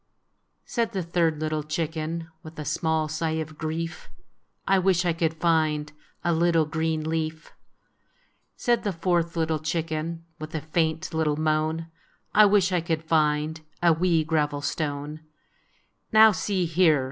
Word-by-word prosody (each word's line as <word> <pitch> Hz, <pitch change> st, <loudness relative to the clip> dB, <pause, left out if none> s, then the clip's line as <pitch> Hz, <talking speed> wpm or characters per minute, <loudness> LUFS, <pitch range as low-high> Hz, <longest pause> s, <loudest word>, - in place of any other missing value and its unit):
" -, -, -48 dB
Said 230 Hz, -2 st, -1 dB
the 190 Hz, -2 st, -1 dB
third 165 Hz, -2 st, +1 dB
little 155 Hz, 0 st, -1 dB
chicken, 160 Hz, +1 st, -3 dB
With 155 Hz, 0 st, -12 dB
a 150 Hz, -, -5 dB
small 160 Hz, +1 st, 0 dB
sigh 160 Hz, +1 st, -2 dB
of 155 Hz, -1 st, -6 dB
grief, 165 Hz, +1 st, -4 dB, 0.3 s
" -, -, -46 dB
I 195 Hz, 0 st, +4 dB
wish 185 Hz, -1 st, +2 dB
I 170 Hz, -, +2 dB
could 165 Hz, -1 st, 0 dB
find 155 Hz, -2 st, +1 dB, 0.3 s
A 170 Hz, -, +2 dB
little 165 Hz, -1 st, +3 dB
green 160 Hz, 0 st, -1 dB
leaf! 160 Hz, 0 st, -3 dB, 0.5 s
" -, -, -40 dB, 0.3 s
Said 240 Hz, -1 st, +1 dB
the 205 Hz, -3 st, -1 dB
fourth 170 Hz, -1 st, 0 dB
little 160 Hz, -1 st, 0 dB
chicken, 160 Hz, +1 st, -3 dB, 0.2 s
With 155 Hz, +1 st, -7 dB
a 155 Hz, -, -2 dB
faint 160 Hz, +1 st, -1 dB
little 155 Hz, -2 st, +1 dB
moan, 155 Hz, +1 st, 0 dB, 0.2 s
" -, -, -40 dB
I 215 Hz, 0 st, +7 dB
wish 195 Hz, -2 st, +3 dB
I 180 Hz, -2 st, +1 dB
could 160 Hz, -1 st, -2 dB
find 155 Hz, 0 st, +1 dB, 0.2 s
A 170 Hz, -1 st, +6 dB
wee 165 Hz, -1 st, +2 dB
gravel 150 Hz, -2 st, 0 dB
stone! 145 Hz, 0 st, -3 dB, 0.5 s
" -, -, -41 dB
"Now, 220 Hz, 0 st, +8 dB
see 190 Hz, -2 st, -1 dB
here!" 165 Hz, -2 st, +4 dB
160 Hz, 165 wpm, -26 LUFS, 155-170 Hz, 0.5 s, Now